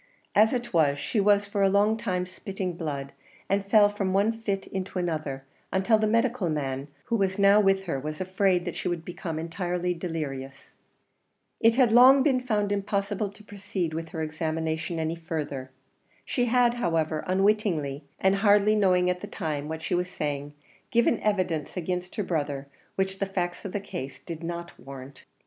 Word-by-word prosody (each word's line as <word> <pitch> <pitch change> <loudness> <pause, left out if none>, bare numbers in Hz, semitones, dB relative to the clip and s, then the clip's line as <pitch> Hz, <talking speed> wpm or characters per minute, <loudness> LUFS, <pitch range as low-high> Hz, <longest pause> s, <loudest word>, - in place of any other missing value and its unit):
As 215 +2 +5
it 240 -4 -3
was, 145 -4 +3
she 175 +9 -1
was 205 0 +4
for 200 0 -2
a 195 - +5
long 205 +3 +3
time 180 -4 -2
spitting 185 0 -5
blood, 145 -5 -4 0.3
and 195 +1 +1
fell 205 +1 +6
from 200 -2 -2
one 205 +4 +3
fit 195 -3 -2
into 190 0 -5
another, 155 -6 -2 0.3
until 195 +4 +3
the 215 - +2
medical 230 -3 +1
man 135 -2 -2 0.2
who 235 - 0
was 195 -3 0
now 200 +1 +6
with 195 -1 +3
her 165 -7 -2
was 155 +3 -5
afraid 185 -1 +1
that - - -4
she - - -3
would 170 -2 -2
become 170 -2 -5
entirely 175 +2 -2
delirious. 145 -6 -5 0.9
It 230 0 +5
had 250 -3 +4
long 260 +3 +8
been 265 -3 +3
found 210 -5 0
impossible 200 0 -1
to 210 +2 -16
proceed 195 -5 -4
with 165 +1 -4
her 160 -1 -4
examination 160 +1 -2
any 160 +1 -2
further. 150 -5 -4 0.6
She 245 - 0
had, 245 0 +3
however, 165 -8 0
unwittingly, 185 -7 +1 0.2
and 190 +1 +3
hardly 205 +1 +4
knowing 185 -3 +3
at 180 0 0
the 205 - -6
time 155 -7 -3
what 160 +1 -5
she - - -2
was 180 0 0
saying, 145 -2 -4 0.3
given 235 -2 +3
evidence 185 -7 -1
against 180 +1 -3
her 210 - -1
brother 145 -6 -2 0.3
which 190 0 -1
the 195 - 0
facts 180 -1 -3
of 195 - -4
the 205 - -2
case 135 -8 -7
did 165 -2 -7
not 170 +1 -6
warrant. 135 +1 -11
185 Hz, 180 wpm, -27 LUFS, 160-205 Hz, 0.9 s, long